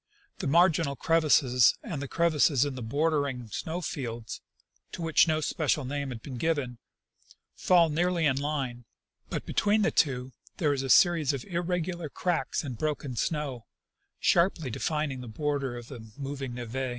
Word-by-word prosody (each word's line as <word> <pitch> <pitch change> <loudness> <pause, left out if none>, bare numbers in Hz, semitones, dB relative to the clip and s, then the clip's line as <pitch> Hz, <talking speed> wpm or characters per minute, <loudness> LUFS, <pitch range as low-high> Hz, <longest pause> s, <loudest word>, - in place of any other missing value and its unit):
The - - -2
marginal 165 -2 +3
crevasses 135 -5 +4
and 145 -5 -5
the 140 - -4
crevasses 150 -4 +3
in 145 - -3
the 130 - -7
border 145 +5 +1
ing 125 -4 -6
snow 165 +10 -4
fields, 120 -8 -5 0.5
to - - -6
which 165 +1 +4
no 155 -1 +1
special 150 -2 0
name 140 +1 -3
has 125 - -5
been 130 0 -7
given, 135 -5 -1 0.7
fall 175 -2 +4
nearly 170 +2 +1
in 140 -3 +3
line; 135 -4 -3 0.4
but - - -4
between 210 +1 +2
the - - +2
two 130 -3 +1 0.3
there 150 -4 +2
is 135 - -2
a 135 - -4
series 165 -2 +5
of 135 -3 -5
irregular 175 -2 -2
cracks 175 +2 -1
and 130 -6 -6
broken 145 -4 -2
snow, 140 -3 -2 0.5
sharply 170 -6 +2
defining 150 0 -2
the 125 - -8
border 135 +1 -2
of 120 -1 -9
the 130 -3 -9 0.2
moving 135 -2 -5
n6ve. 125 +2 -4
145 Hz, 165 wpm, -28 LUFS, 130-165 Hz, 0.7 s, series